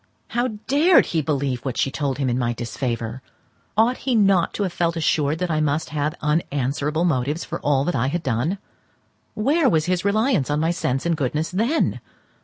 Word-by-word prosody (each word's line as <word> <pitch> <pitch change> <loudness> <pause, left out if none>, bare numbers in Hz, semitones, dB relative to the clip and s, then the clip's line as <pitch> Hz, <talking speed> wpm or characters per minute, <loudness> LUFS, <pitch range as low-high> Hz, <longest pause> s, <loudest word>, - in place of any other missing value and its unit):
How 240 +2 0 0.2
dared 315 +6 +5
he 160 - +2
believe 135 -4 -1
what 130 -3 -3
she 135 - +1
told 140 -3 -2
him 135 -2 -1
in 125 0 0
my 120 -1 0
disfavour! 120 0 -4 0.6
Ought 235 +4 +3
he 255 -2 -1
not 195 -5 +3
to 205 - -1
have 185 -3 -2
felt 170 -1 0
assured 155 -1 +1
that 180 0 -2
I 155 - +1
must 150 +1 0
have 150 0 -1
unanswerable 150 +1 0
motives 145 0 0
for 170 - -5
all 140 -2 +1
that 175 - -1
I 130 0 +1
had 170 +4 -2
done? 130 - 0 0.8
Where 280 +7 +2
was 155 -1 +2
his 180 -1 0
reliance 210 - +1
on 145 +1 +1
my 165 +2 +1
sense 135 -5 -1
and 170 -1 +2
goodness 150 +2 -2
then? 230 - +1
155 Hz, 195 wpm, -22 LUFS, 135-180 Hz, 0.8 s, dared